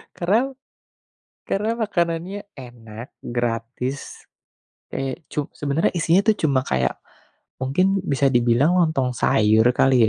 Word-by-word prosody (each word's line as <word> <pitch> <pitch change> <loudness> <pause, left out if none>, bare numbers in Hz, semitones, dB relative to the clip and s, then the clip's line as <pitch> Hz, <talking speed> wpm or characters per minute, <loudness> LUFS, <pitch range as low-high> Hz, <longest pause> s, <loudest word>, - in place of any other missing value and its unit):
Karena 220 +10 +1 0.9
karena 220 +4 -1
makanannya 190 -1 -2
enak, 120 -2 -11
gratis, 120 +3 -4 0.7
kayak 135 +4 -4
cu 150 -2 -2
sebenernya 145 +2 0
isinya 170 +2 +3
tuh 220 - +5
cuma 130 -2 +1
kayak, 65 -1 0 0.6
mungkin 185 +8 +1
bisa 140 -5 +1
dibilang 120 +7 +3
lontong 135 -7 +1
sayur 110 0 +3
kali 130 -1 +4
140 Hz, 105 wpm, -22 LUFS, 120-180 Hz, 0.9 s, tuh